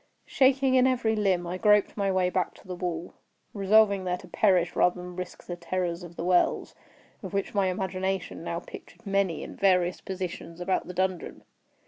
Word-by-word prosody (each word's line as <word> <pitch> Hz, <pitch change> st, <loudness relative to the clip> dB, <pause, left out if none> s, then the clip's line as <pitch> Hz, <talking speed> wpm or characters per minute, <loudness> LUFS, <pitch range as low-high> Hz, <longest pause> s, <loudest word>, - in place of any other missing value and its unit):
Shaking 265 Hz, 0 st, +3 dB
in 260 Hz, 0 st, +5 dB
every 240 Hz, -4 st, +1 dB
limb, 190 Hz, -4 st, +1 dB
I 180 Hz, +2 st, -4 dB
groped 210 Hz, 0 st, +4 dB
my 200 Hz, -2 st, 0 dB
way 185 Hz, -1 st, +1 dB
back 180 Hz, -2 st, -1 dB
to -, -, -18 dB
the 185 Hz, -, -4 dB
wall—resolving 195 Hz, +4 st, 0 dB
there 180 Hz, -1 st, -1 dB
to -, -, -13 dB
perish 180 Hz, -5 st, +2 dB
rather 180 Hz, 0 st, +3 dB
than 180 Hz, 0 st, -8 dB
risk 180 Hz, -1 st, -7 dB
the 175 Hz, -, -5 dB
terrors 175 Hz, 0 st, -3 dB
of 175 Hz, -1 st, -10 dB
the -, -, -5 dB
wells, 180 Hz, -1 st, +2 dB, 0.5 s
of -, -, -6 dB
which 200 Hz, -, -2 dB
my 200 Hz, -2 st, +2 dB
imagination 190 Hz, -2 st, -3 dB
now 170 Hz, 0 st, -3 dB
pictured -, -, -13 dB
many 195 Hz, -4 st, 0 dB
in -, -, -9 dB
various 180 Hz, -2 st, +2 dB
positions 180 Hz, -2 st, -6 dB
about 185 Hz, +1 st, -1 dB
the 180 Hz, -, -7 dB
dungeon. 185 Hz, -1 st, -2 dB
185 Hz, 180 wpm, -27 LUFS, 180-200 Hz, 0.5 s, in